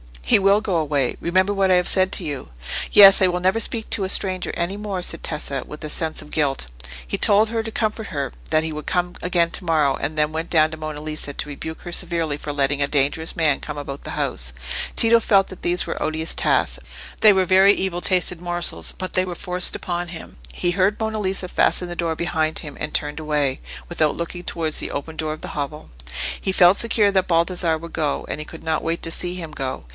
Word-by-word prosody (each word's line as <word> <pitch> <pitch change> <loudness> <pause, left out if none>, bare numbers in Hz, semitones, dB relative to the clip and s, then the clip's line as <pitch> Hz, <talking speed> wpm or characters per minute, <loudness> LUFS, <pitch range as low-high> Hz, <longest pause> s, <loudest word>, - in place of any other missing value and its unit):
"He - - +4
will 200 +2 +4
go 195 -5 0
away. 145 -5 0
Remember 185 +4 +1
what 195 -1 +2
I - - +5
have 180 0 +3
said 190 0 +2
to - - +3
you." 145 -4 -5 0.4
"Yes; 195 -1 +9
I 190 - +6
will 180 0 -1
never 190 +5 +2
speak 225 -1 -2
to 195 - +1
a - - -4
stranger 185 -2 +2
any 175 +4 -2
more," 200 -3 -4
said 165 - 0
Tessa, 140 -2 -3
with 150 - -9
a 155 - -4
sense 160 +1 -1
of 150 - -14
guilt. 140 - 0 0.4
He - - -3
told 215 +1 +5
her, 225 0 -1
to 225 - -5
comfort 220 -1 -2
her, 140 -5 -3 0.2
that 155 0 +2
he 160 - -3
would 150 0 -6
come 180 0 -1
again 175 -2 +1
to 185 - -3
morrow; 155 -4 +2
and 155 +1 -3
then 150 0 +2
went 160 +2 -4
down 155 -1 +4
to 160 - -7
Monna 155 -1 -6
Lisa 155 -2 -3
to 150 - -4
rebuke 160 +3 -7
her 175 - -8
severely 170 -4 -1
for 150 0 -5
letting 140 0 +1
a 140 - +2
dangerous 145 +3 0
man 155 -4 +2
come 150 -1 -7
about 140 -1 -6
the - - -5
house. - - -2 0.4
Tito 230 0 +6
felt 195 -3 +3
that 185 - -11
these 175 +1 +1
were - - -5
odious 160 +1 -1
tasks; - - +1 0.4
they 215 -1 +7
were 190 -1 +2
very 190 +2 +6
evil 185 -3 -2
tasted 180 -2 +1
morsels, 175 0 -1
but 185 0 -5
they 185 - +2
were 180 -1 -5
forced 180 0 0
upon 175 0 -3
him. 170 -2 -9 0.2
He 175 - 0
heard 195 +3 +2
Monna 220 -1 -2
Lisa 190 -2 -2
fasten 180 0 +1
the 175 - -5
door 165 -1 -1
behind 160 -2 -1
him, 150 -3 -9
and 155 - -4
turned 150 +1 -1
away, 150 -3 0 0.3
without 155 -2 +1
looking 175 +1 -5
towards 160 -2 -2
the - - -1
open 155 +3 -5
door 155 -1 -2
of 155 - -10
the - - -6
hovel. 150 +2 -5 0.5
He 190 - -2
felt 180 +1 +6
secure 220 -3 +3
that 190 -1 +1
Baldassarre 170 -1 +1
would 170 +1 -10
go, 150 -3 -1
and - - -3
he 150 - -5
could 165 - -11
not 160 -1 0
wait 165 +1 -3
to 165 - -2
see 180 +1 0
him 165 -4 -7
go. 135 -3 -5
170 Hz, 235 wpm, -22 LUFS, 155-185 Hz, 0.5 s, Yes